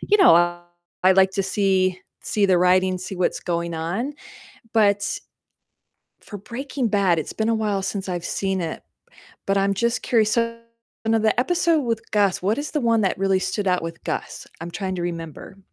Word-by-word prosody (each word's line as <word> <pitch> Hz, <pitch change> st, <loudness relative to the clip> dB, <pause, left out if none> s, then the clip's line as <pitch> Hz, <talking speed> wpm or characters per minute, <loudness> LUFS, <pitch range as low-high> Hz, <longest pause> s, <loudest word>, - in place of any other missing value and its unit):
you 415 Hz, -, +2 dB
know, 375 Hz, -, +8 dB, 0.7 s
I 190 Hz, -, +7 dB
like 190 Hz, 0 st, +4 dB
to 195 Hz, +1 st, 0 dB
see 190 Hz, -2 st, +1 dB, 0.2 s
see 210 Hz, -, 0 dB
the 185 Hz, -2 st, +4 dB
writing, 185 Hz, +1 st, +3 dB
see 185 Hz, +1 st, -6 dB
what's 180 Hz, -1 st, 0 dB
going 170 Hz, -1 st, -2 dB
on. 175 Hz, -, -3 dB, 0.6 s
But 205 Hz, -2 st, +3 dB, 1.1 s
for 205 Hz, -, -9 dB
Breaking 250 Hz, +4 st, -3 dB
Bad, 195 Hz, -5 st, +2 dB
it's 155 Hz, -, -4 dB
been 220 Hz, +1 st, -1 dB
a 230 Hz, -, +2 dB
while 210 Hz, -3 st, -1 dB
since 195 Hz, 0 st, -4 dB
I've 175 Hz, -2 st, -3 dB
seen 190 Hz, 0 st, -1 dB
it, 165 Hz, -2 st, -4 dB, 0.6 s
but 195 Hz, 0 st, +2 dB
I'm 195 Hz, 0 st, +1 dB
just 235 Hz, +4 st, 0 dB
curious. 220 Hz, -3 st, +2 dB
So, 230 Hz, 0 st, 0 dB, 0.4 s
one 225 Hz, 0 st, +2 dB
of 225 Hz, -, +2 dB
the 220 Hz, +1 st, +2 dB
episode 335 Hz, +3 st, +2 dB
with 230 Hz, -4 st, -3 dB
Gus, 200 Hz, -4 st, +2 dB
what 210 Hz, +6 st, +1 dB
is 295 Hz, +1 st, -4 dB
the 300 Hz, -, -1 dB
one 230 Hz, -3 st, +2 dB
that 190 Hz, -2 st, 0 dB
really 195 Hz, 0 st, +2 dB
stood 200 Hz, +2 st, -2 dB
out 180 Hz, -1 st, +1 dB
with 165 Hz, 0 st, -7 dB
Gus? -, -, -4 dB
I'm 170 Hz, +1 st, -6 dB
trying 190 Hz, 0 st, -3 dB
to 175 Hz, -, -3 dB
remember. 170 Hz, +2 st, -6 dB
195 Hz, 190 wpm, -23 LUFS, 185-225 Hz, 1.1 s, know